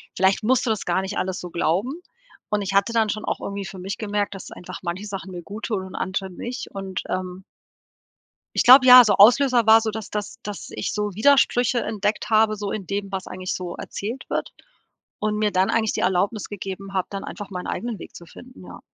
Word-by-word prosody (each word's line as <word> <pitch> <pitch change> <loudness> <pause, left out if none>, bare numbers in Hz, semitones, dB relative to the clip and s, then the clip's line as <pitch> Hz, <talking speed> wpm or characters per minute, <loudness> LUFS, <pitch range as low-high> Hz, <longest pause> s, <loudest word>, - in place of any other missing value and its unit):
vielleicht 190 +3 +2
musst 255 +3 +2
du 235 - 0
das 215 - -2
gar 175 +2 +1
nicht 190 +2 -5
alles 185 -1 -2
so 180 - -7
glauben“, 185 - 0 0.6
und 210 -1 0
ich 195 0 -3
hatte 200 +4 +2
dann 220 -2 +2
schon 215 +1 -3
auch - - -2
irgendwie 200 0 -5
für 190 0 -8
mich 195 +2 -5
gemerkt, 205 -1 -2
dass 190 - -9
einfach 180 - -9
manche 180 +4 -4
Sachen 195 -2 -6
mir 175 -1 -7
guttun 205 0 -4
und 190 - -10
andere 190 0 -3
nicht 240 +8 -6
und, 195 -2 -5
ähm 185 0 -4 1.1
ich - - +3
glaube, 255 +1 +9
ja, 250 -1 +11
so 205 - +3
Auslöser 240 +3 +5
war 220 +1 +8
so, 220 - -2
dass 220 0 -7
dass 210 -1 -5
dass 205 -1 -7
ich - - -4
so 210 -2 -2
Widersprüche 245 +1 +3
entdeckt 210 +1 -2
habe, 215 0 +4
so 205 -1 -4
in 195 -4 -5
dem, 200 0 -4
was 190 -1 -4
eigentlich 185 0 -4
so 180 -1 -5
erzählt 230 +6 -6
wird - - -2 0.7
und 210 0 -1
mir 210 -1 +1
dann 185 +1 +2
eigentlich 220 -2 +1
die - - -2
Erlaubnis 190 +4 0
gegeben 195 0 -7
habe, 185 -1 -1
dann 195 0 -5
einfach 205 -2 -7
meinen 180 -2 -6
eigenen 235 -3 -4
Weg - - -11
zu 170 - -11
finden, 250 +9 -14
ja. - - -11
205 Hz, 220 wpm, -23 LUFS, 190-220 Hz, 1.1 s, ja